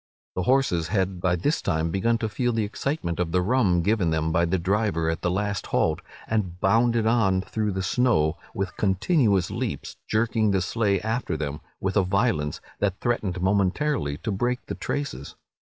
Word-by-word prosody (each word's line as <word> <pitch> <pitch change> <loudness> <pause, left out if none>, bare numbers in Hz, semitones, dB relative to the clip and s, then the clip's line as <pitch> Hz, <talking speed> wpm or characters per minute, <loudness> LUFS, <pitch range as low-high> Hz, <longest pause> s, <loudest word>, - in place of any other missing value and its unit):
The 90 - 0
horses 125 -12 +2
had 95 -1 -1
by 90 -1 +2
this 145 - 0
time 80 +1 0
begun 115 +6 +1
to 115 - -2
feel 120 +3 -1
the 110 -1 +1
excitement 105 - -3
of 85 -2 0
the 90 +1 +2
rum 95 -6 +2
given 105 -4 +2
them 80 0 0
by 85 +2 +3
the 90 +3 +1
driver 95 -3 0
at 80 - -4
the 85 - 0
last 100 +1 -2
halt, - - +1 0.3
and 95 -6 -1
bounded 115 +3 +3
on 110 -5 +3
through 105 0 -2
the 95 0 -2
snow 90 -8 +2 0.2
with 95 -1 -3
continuous 100 - +2
leaps, - - -4
jerking 110 0 +1
the 95 -2 +2
sleigh 100 -1 +1
after 110 -5 -2
them 75 0 -4 0.2
with 95 0 -2
a 100 - +4
violence 95 -6 0 0.2
that 100 -2 0
threatened 105 -7 -1
momently 100 - +1
to 105 - -4
break 120 +6 -1
the - - -5
traces. 135 - -4
95 Hz, 180 wpm, -25 LUFS, 90-115 Hz, 0.3 s, a